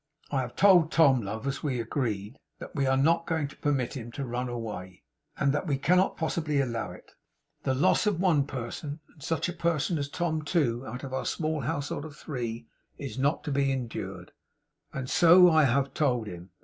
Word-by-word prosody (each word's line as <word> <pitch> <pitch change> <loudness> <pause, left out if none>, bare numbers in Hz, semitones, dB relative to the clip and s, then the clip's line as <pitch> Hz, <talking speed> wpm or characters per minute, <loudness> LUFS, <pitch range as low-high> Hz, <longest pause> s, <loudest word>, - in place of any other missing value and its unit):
'I 135 -2 +1
have 120 -1 -6
told 180 -5 +6
Tom, 140 -6 +5
love, 110 +4 -5
as 140 0 -2
we 135 -6 -1
agreed, 115 -1 -3 0.2
that - - -9
we 140 -2 +1
are 135 0 +3
not 165 +5 +2
going 160 -3 0
to - - -14
permit 135 -5 0
him 120 -3 -6
to 140 - -4
run 125 +1 -3
away, 105 -6 -6 0.3
and 140 0 +2
that 150 +5 -2
we 140 -3 +1
cannot 180 +7 +2
possibly 155 -3 -1
allow 115 -4 -2
it. - - -14 0.5
The 130 - +1
loss 145 - +3
of 200 -5 +1
one 160 -7 +3
person, 140 +3 -5
and 150 - -21
such 160 +3 -1
a 175 - -3
person 170 -1 0
as 140 0 -3
Tom, 160 0 -1
too, 140 -7 0
out 125 +5 -6
of 135 -1 -6
our 130 - -2
small 155 -1 -1
household 145 +1 -3
of 150 -2 -10
three, 120 -6 -5 0.3
is 135 -2 -6
not 140 +4 +1
to 150 - -3
be 140 0 +2
endured; 115 -7 -5 0.6
and 135 -2 -5
so 175 +5 +7
I 155 -2 +5
have 135 +2 +1
told 125 -7 +1
him. 90 -2 -9
140 Hz, 200 wpm, -28 LUFS, 120-155 Hz, 0.6 s, so